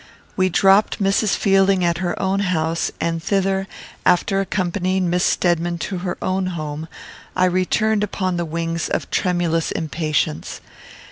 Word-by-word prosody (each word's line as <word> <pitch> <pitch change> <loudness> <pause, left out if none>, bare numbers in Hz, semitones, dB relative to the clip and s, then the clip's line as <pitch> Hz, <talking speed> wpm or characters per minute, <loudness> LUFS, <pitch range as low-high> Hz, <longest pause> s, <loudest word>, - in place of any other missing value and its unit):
We 185 0 +2
dropped 195 +3 +4
Mrs. 195 +1 +2
Fielding 195 -2 +3
at 170 0 +1
her 175 -2 -2
own 190 +1 0
house, 165 -4 0
and 165 0 -1
thither, 195 +1 0 0.4
after 195 +2 +2
accompanying 185 -1 -1
Miss 180 +1 +1
Stedman 175 -1 +1
to 185 +2 -4
her 180 0 -3
own 185 0 0
home, 155 0 -5 0.5
I 185 - +3
returned 205 +4 +1
upon 185 -3 -2
the 175 - -1
wings 165 0 -3
of - - -3
tremulous 175 -3 0
impatience. 155 - -2
180 Hz, 140 wpm, -21 LUFS, 170-195 Hz, 0.5 s, dropped